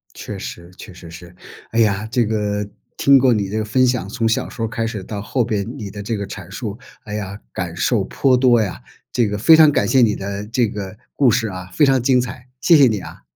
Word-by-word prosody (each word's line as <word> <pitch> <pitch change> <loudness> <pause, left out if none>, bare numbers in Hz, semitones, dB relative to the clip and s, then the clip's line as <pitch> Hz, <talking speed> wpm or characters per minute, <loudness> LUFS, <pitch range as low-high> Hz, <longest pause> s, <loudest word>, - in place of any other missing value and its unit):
确 - - -7
实， 85 +1 -8
确 100 - -11
实 85 -1 -12
是。 90 +1 -12 0.4
哎 115 - 0
呀， 105 -1 +1
这 120 -1 +2
个 105 -1 -2 0.3
听 140 0 +6
过 130 -1 +4
你 100 -3 -1
这 110 - -3
个 110 - -1
分 130 +4 +2
享， 125 -5 0
从 115 +1 -1
小 110 - 0
时 115 - -9
候 115 - 0
开 115 +1 -3
始 110 -4 -5
到 100 +1 -6
后 120 +4 -1
边， 110 +1 -3
你 105 -6 -6
的 100 +1 -7
这 110 +2 -3
个 100 - -4
阐 95 -2 -9
述。 105 -1 -6 0.3
哎 105 - -8
呀， 100 -1 -5
感 85 -2 -4
受 100 +4 +1
颇 130 +6 +2
多 120 -3 +4
呀。 100 -4 -4 0.3
这 120 -3 +1
个 105 0 -3
非 160 +10 +6
常 155 -2 +7
感 100 -7 +1
谢 130 +2 +4
你 110 -4 +3
的 100 +1 -5
这 115 +2 0
个 100 -1 -7 0.2
故 135 -3 +4
事 115 -1 0
啊， 90 -2 -7
非 150 - +4
常 135 -2 +3
精 125 0 +3
彩， 125 0 -8
谢 170 - +6
谢 140 -3 +6
你 105 -3 0
啊。 - - -11
110 Hz, 265 characters per minute, -19 LUFS, 100-125 Hz, 0.4 s, 常